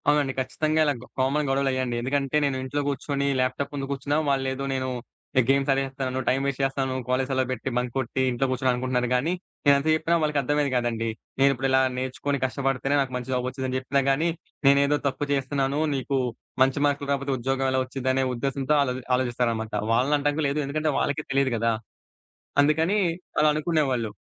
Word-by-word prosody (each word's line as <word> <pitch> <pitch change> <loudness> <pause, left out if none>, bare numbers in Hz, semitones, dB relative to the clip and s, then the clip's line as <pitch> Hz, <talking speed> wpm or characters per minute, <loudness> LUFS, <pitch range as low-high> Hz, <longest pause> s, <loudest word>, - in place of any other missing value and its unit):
అవునండి. 145 -2 +2
ఖచ్చితంగా 155 +4 0
ఇలా 145 - +2
గొ 125 - -12
కామన్ 140 +3 +1
గొడవలయ్యాయండి. 130 -2 0
ఎందుకంటే, 135 +3 0
నేను 140 -2 0
ఇంట్లో 145 +2 -2
గూర్చొనీ, 140 0 -1
ల్యాప్‌టాప్ 130 +2 -1
ముందు 135 -1 -4
గూర్చున్నా, 140 +2 -1
వాళ్ళేదో 135 0 0
నేను, 130 -1 -1 0.5
ఎ - - +7
గేమ్స్ 140 +1 +3
ఆడేస్తాను, 135 -1 -2
టైమ్ 135 +1 +1
వేస్ట్ 140 0 -2
చేస్తాను, 135 -1 0
కాలేజీ 130 +1 +1
సెలవు 130 -1 0
బెట్టి, 130 +1 -3
బంక్ 125 -1 -1
కొట్టీ, 130 0 -1
ఇంట్లో 125 +2 0
గూర్చున్నా 130 0 +1
అనుకుంటున్నారు 125 -1 -1
గానీ, 150 +8 +1 0.3
నేనేంత 140 +1 +4
చెప్పినా 165 +2 +1
వాళ్ళకర్థమయ్యేది 145 -1 +1
గాదండీ! 115 -2 0 0.3
నేనిప్పుడిలా 135 -1 +3 0.2
నేర్చుకొని, 130 +2 -2
కష్టపడితేనే, 135 +1 0
నాకు 130 -2 -3
మంచి 125 +1 -6
జాబొచ్చుదని 130 +1 -2
చెప్పినా 140 +1 0
గానీ, 155 +5 +1 0.4
నేనేదో 140 +1 +5
తప్పు 145 +2 -2
చేస్తున్నానూ, 140 +1 0
నీకూ 135 +1 -1 0.4
మంచి 135 +2 +1
మార్కులు 140 0 -1
రాపోతే, 140 0 -1
ఉద్యోగం 135 +2 0
ఎలా 130 - +2
ఒచ్చిదనే 130 0 0
ఉద్దేశంతో, 135 +3 -1
ఆళ్ళది 130 -2 -1
ఆలోచిస్తారనమాట. 120 -3 -1 0.2
వాళ్ళనంటానికి 145 +4 +2
గూడా 145 - +2
లేదు, 145 +2 0
ఎందుకంటే, 155 +2 0
వాళ్ళకే 145 +2 -1
తెలీదు 135 -1 +2
గదా! 115 +1 +1 0.9
అందుకనీ, 160 +7 +2 0.4
అలా 155 - +5
అనుకునేవాళ్ళు. 145 -8 0
135 Hz, 160 wpm, -25 LUFS, 130-140 Hz, 0.9 s, ఎ